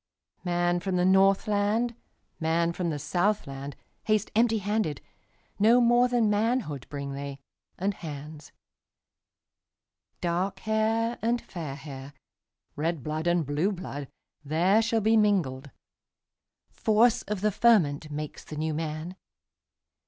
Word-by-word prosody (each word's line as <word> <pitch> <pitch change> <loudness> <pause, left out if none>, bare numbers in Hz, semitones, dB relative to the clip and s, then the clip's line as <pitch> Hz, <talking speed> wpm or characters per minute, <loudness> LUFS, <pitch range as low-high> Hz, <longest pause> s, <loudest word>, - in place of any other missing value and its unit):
Man 175 -1 +1
from 185 +1 -2
the 180 0 +2
Northland, 205 +4 +3 0.5
Man 170 +1 +1
from 175 -1 -2
the 150 - -2
Southland, 145 -3 -1 0.3
Haste 215 -1 +1
empty 225 0 +3
handed; 205 -7 -1 0.6
No 225 +4 +6
more 240 +1 +5
than 240 -3 +2
manhoodBring 155 - -1
they, 140 0 -6 0.4
and 200 +3 0
hands. 150 -2 -9 1.7
Dark 185 +3 -1
hair 225 +2 0
and 235 +2 +1
fair 160 -10 -7
hair, 140 -1 -9 0.6
Red 160 -2 -2
blood 155 +3 -3
and 175 -2 +2
blue 150 +8 0
blood, 145 -7 -6 0.4
There 175 +9 +3
shall 225 0 +1
be 220 +2 +4
mingled; 165 -11 +1 1.0
Force 225 +2 +3
of 205 -2 -3
the 210 0 +2
fermentMakes 150 -9 +1
the 155 - -9
New 155 +1 -1
Man. 155 +3 -4
180 Hz, 115 wpm, -27 LUFS, 150-215 Hz, 1.7 s, No